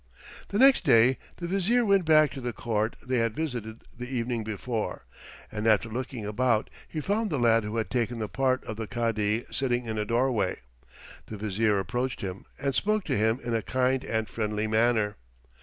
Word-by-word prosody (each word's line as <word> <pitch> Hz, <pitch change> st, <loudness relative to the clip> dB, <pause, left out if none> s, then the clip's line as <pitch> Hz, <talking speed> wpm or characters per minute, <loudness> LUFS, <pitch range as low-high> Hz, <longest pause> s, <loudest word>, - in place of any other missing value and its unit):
The 200 Hz, -, -2 dB
next 265 Hz, +3 st, +6 dB
day 120 Hz, +3 st, +5 dB, 0.2 s
the 175 Hz, -, -5 dB
Vizier 195 Hz, +7 st, +2 dB
went 195 Hz, -3 st, +3 dB
back 155 Hz, -3 st, +5 dB
to 135 Hz, -, -7 dB
the 120 Hz, -1 st, -3 dB
court 110 Hz, -1 st, -1 dB
they 125 Hz, -1 st, +1 dB
had 115 Hz, -1 st, 0 dB
visited 120 Hz, -8 st, -4 dB
the 125 Hz, 0 st, -7 dB
evening 120 Hz, -2 st, -2 dB
before, 110 Hz, +1 st, -4 dB, 0.5 s
and 105 Hz, +1 st, -2 dB
after 110 Hz, +1 st, +3 dB
looking 120 Hz, -1 st, -5 dB
about 110 Hz, +1 st, +1 dB, 0.2 s
he 155 Hz, -, -5 dB
found 210 Hz, +5 st, 0 dB
the 150 Hz, -, -1 dB
lad 115 Hz, -2 st, +4 dB
who 105 Hz, +2 st, -4 dB
had 110 Hz, -, -2 dB
taken 120 Hz, -1 st, 0 dB
the 110 Hz, -1 st, -3 dB
part 130 Hz, +2 st, 0 dB
of 110 Hz, -, -6 dB
the 110 Hz, -1 st, -4 dB
Cadi 115 Hz, -2 st, 0 dB
sitting 125 Hz, -2 st, 0 dB
in 110 Hz, -1 st, -3 dB
a 105 Hz, -, -1 dB
doorway. 120 Hz, 0 st, +1 dB, 0.7 s
The 110 Hz, -, -7 dB
Vizier 105 Hz, +1 st, +1 dB
approached 120 Hz, +7 st, -2 dB
him 95 Hz, -1 st, -5 dB
and 140 Hz, 0 st, -1 dB
spoke 215 Hz, +7 st, +1 dB
to 140 Hz, -, -1 dB
him 110 Hz, +2 st, +2 dB
in 120 Hz, -1 st, -2 dB
a 115 Hz, -, +1 dB
kind 130 Hz, +3 st, 0 dB
and 110 Hz, -1 st, -1 dB
friendly 105 Hz, -1 st, -2 dB
manner. 110 Hz, -1 st, +2 dB
120 Hz, 190 wpm, -27 LUFS, 110-130 Hz, 0.7 s, next